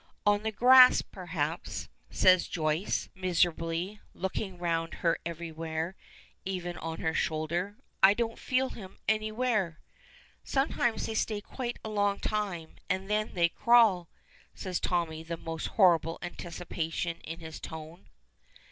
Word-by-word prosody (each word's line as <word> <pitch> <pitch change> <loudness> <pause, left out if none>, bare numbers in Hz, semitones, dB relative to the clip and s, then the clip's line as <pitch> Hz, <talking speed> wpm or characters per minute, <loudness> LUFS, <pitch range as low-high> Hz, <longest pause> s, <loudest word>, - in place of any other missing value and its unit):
"On 205 0 +4
the 220 +1 -2
grass, 255 +3 +8
perhaps," 170 -3 -4 0.2
says 185 -1 +4
Joyce, 155 +3 -1
miserably, 175 +1 0
looking 190 0 -3
round 165 -1 -1
her 165 - +3
everywhere, 165 -1 -4
and - - -24
even 180 -2 -3
on 165 0 -5
her 160 - 0
shoulder. 170 +6 -1 0.3
"I 195 +2 +7
don't 230 0 -2
feel 260 +1 +1
him 190 -6 -10
anywhere." 215 -5 0 0.6
"Sometimes 270 -4 0
they 225 - -3
stay 215 -1 0
quite 240 +3 -5
a - - -3
long 205 -1 +1
time, 195 -7 -3
and 190 +1 -1
then 215 0 0
they 170 -1 +4
crawl!" 215 -5 +4 0.5
says 185 -2 -3
Tommy, 165 -3 -1
the 165 +1 -5
most 165 -1 -4
horrible 170 -5 +4
anticipation 170 -1 -4
in 165 +1 -7
his 160 -1 -8
tone. 160 +3 -9
180 Hz, 130 wpm, -30 LUFS, 165-210 Hz, 0.6 s, grass